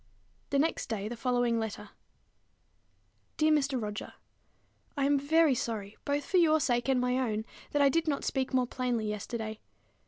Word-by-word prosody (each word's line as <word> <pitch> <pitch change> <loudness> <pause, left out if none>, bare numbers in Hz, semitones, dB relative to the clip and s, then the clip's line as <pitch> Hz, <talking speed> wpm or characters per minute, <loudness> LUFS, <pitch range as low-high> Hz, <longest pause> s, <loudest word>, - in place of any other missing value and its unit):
The 280 - +1
next 315 +4 0
day 220 -3 -2
came 210 - -4
the 240 - -5
following 245 -1 +1
letter: 220 -2 -5 1.5
Dear 310 0 +3
Mr. 280 -3 +2
Roger, 210 -1 -5 0.8
I 275 - +2
am 285 0 +3
very 310 +1 +4
sorry, 220 -4 -3
both 285 +1 -1
for 375 - +1
your 315 -3 +5
sake 240 -2 0
and 260 -2 +3
my 250 +1 +1
own, 220 -4 -1 0.2
that 290 -1 +2
I 280 - +6
did 330 +3 +1
not 285 -2 0
speak 265 -1 -1
more 255 -2 +2
plainly 245 -2 -2
yesterday. 215 +1 -4
255 Hz, 175 wpm, -30 LUFS, 225-285 Hz, 1.5 s, I